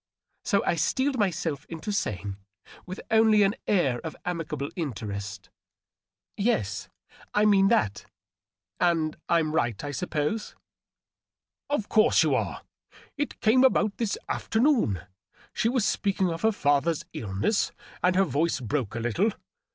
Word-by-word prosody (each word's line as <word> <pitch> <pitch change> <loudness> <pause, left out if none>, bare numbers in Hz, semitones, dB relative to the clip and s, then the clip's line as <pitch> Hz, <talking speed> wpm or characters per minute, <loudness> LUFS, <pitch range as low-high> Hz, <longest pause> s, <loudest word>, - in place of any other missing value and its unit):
So 200 -4 +1
I - - +2
steeled 260 - +1
myself 165 -7 -1
into 165 +5 -5
saying, 100 - -2 0.5
with 185 +2 -6
only 220 -1 +5
an 195 +1 +3
air 140 -12 +2
of 160 - -6
amicable 165 -5 -3
interest, 105 - -5 0.2
— - - -67
" - - -67
Yes, 100 - 0 0.5
I 210 +1 +4
mean 195 -2 +5
that. 195 - +1 0.7
And 165 -3 +2
I'm 165 -2 +2
right, 120 -10 0
I 145 - -3
suppose 150 - -2 0.3
!" - - -66
" - - -66
Of 255 -8 -1
course 215 - +4
you - - +2
are! - - -2 0.5
It 290 0 -4
came 240 +4 +5
about 215 -5 +3
this 225 -4 -1
afternoon. 225 - +1 0.5
She 225 - +1
was 245 -4 +1
speaking 195 -3 +1
of 165 0 -5
her 220 0 +3
Other's 145 +3 +2
illness, 105 - 0 0.3
and 180 0 +3
her 195 - +5
voice 165 -1 0
broke 125 -2 -2
a - - -2
little. 120 - +1
170 Hz, 145 wpm, -27 LUFS, 130-210 Hz, 0.7 s, only